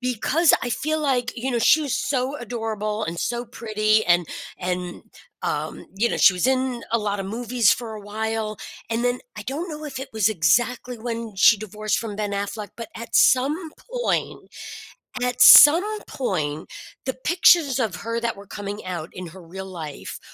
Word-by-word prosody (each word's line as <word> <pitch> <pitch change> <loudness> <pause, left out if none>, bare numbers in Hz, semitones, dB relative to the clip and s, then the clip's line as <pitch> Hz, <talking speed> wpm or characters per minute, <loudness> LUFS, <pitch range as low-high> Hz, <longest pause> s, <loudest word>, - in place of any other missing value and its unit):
Because 255 +7 +2
I 245 - -2
feel 310 +6 -1
like 260 -5 0
you 260 +3 -3
know, 240 - 0
she 305 +7 +4
was 285 -4 -3
so 260 0 -1
adorable 220 -3 -3
and 170 -3 -5
so 240 +5 -2
pretty 215 -2 0
and 175 -1 +3 0.3
and, 180 -1 -4 0.4
um, - - -3
you 220 +5 +1
know, - - -2
she 195 - +6
was 180 +3 0
in 260 -2 0
a 230 - +3
lotta 205 -2 -2
movies 230 +1 +1
for 230 -1 -1
a 215 - -8
while, 215 +1 -3 0.3
and 230 +1 -1
then, 245 0 +1 0.2
I 210 - -6
don't 290 - -4
know 305 -1 -7
if 270 -3 -6
it 265 - -6
was 220 -2 +2
exactly 235 +7 +1
when 230 -2 -5
she 225 +4 +6
divorced 215 +1 -2
from 215 -3 -5
Ben 205 -1 -3
Affleck, 200 +1 -4
but 230 -2 -7
at 230 +2 -9
some 300 +6 +3 0.3
point - - -2 0.7
at 250 0 -1
some 385 +9 +8
point, 155 - -3 0.3
the 260 - -1
pictures 305 -2 +3
of 215 -7 -1
her 230 +2 -4
that 230 -3 -2
were 200 - -12
coming 205 +1 -7
out 175 -3 -5
in 180 -1 -8
her 185 +3 -13
real 190 +3 -8
life 165 -6 -8
225 Hz, 180 wpm, -23 LUFS, 205-255 Hz, 0.7 s, some